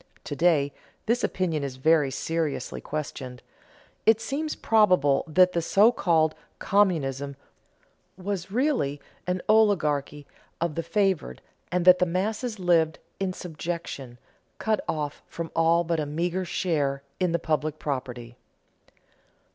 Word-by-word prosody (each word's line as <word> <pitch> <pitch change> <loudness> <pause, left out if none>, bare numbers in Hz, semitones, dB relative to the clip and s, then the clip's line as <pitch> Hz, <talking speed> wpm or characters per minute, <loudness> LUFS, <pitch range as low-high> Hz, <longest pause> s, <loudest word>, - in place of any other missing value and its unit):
To - - -5
day 150 -4 +2 0.3
this 235 +2 +1
opinion 165 -6 -1
is 135 -2 -4
very 150 +1 +3
seriously 160 +2 -3
questioned. 135 -4 -6 0.6
It 220 0 +6
seems 300 +6 -3
probable 180 -11 +3
that 180 +3 +5
the 170 - 0
so 205 +7 +5
called 160 -8 +2 0.2
communism 140 -9 +1 0.8
was 190 -1 -4
really 225 - 0 0.3
an 180 0 -1
oligarchy 155 -10 +2 0.3
of 170 -2 -1
the 165 - -2
favored, 185 - 0 0.3
and 180 -1 0
that 180 0 +8
the 180 - +3
masses 215 +6 -2
lived 165 -4 +2 0.2
in 190 -1 -1
subjection, 165 -7 -6 0.4
cut 220 -1 0
off 150 -2 -3
from 170 -1 -6
all 165 +1 +4
but 165 -1 -1
a 150 - -2
meager 175 +5 -1
share 145 -7 -1 0.2
in 180 -2 +1
the 170 - +2
public 155 -2 -1
property. 125 -5 -5
165 Hz, 130 wpm, -26 LUFS, 145-185 Hz, 0.8 s, that